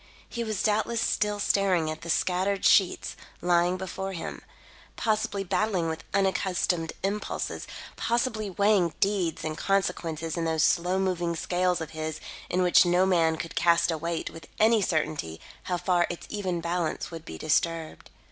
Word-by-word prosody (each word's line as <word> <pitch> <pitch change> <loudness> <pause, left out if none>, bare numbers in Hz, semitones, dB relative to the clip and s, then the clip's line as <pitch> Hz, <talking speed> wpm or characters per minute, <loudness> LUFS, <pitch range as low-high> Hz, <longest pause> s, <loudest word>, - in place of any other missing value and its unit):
He 235 - -4
was 215 -3 -2
doubtless 220 +2 +1
still 210 -2 0
staring 185 -6 +2
at 155 - -7
the 170 - -8
scattered 190 +3 +1
sheets 190 -3 +3 0.2
lying 175 +1 +2
before 190 +1 -5
him; 165 - -6 0.5
possibly 215 -3 0
battling 185 -3 0
with 160 0 -5
unaccustomed 190 -3 0
impulses; 205 +2 -3 0.3
possibly 230 -3 0
weighing 200 -3 +2
deeds 195 -5 0
and 155 -1 -3
consequences 170 -4 -1
in 165 - -1
those 160 -1 +1
slow 180 +2 +2
moving 175 -3 0
scales 180 +1 0
of 160 - -5
his 155 -1 -4 0.3
in 185 +1 +1
which 180 - +6
no 180 +1 +3
man 165 -4 +3
could 165 - -6
cast 170 0 +3
a 160 - -1
weight 170 +1 -3
with 165 - -11
any 220 0 +5
certainty 155 - -1 0.3
how 180 - -1
far 175 -1 +2
its 175 - -6
even 185 -5 -2
balance 170 -1 -2
would 165 -1 -7
be - - -8
disturbed. 160 +1 -1
180 Hz, 155 wpm, -27 LUFS, 165-195 Hz, 0.5 s, which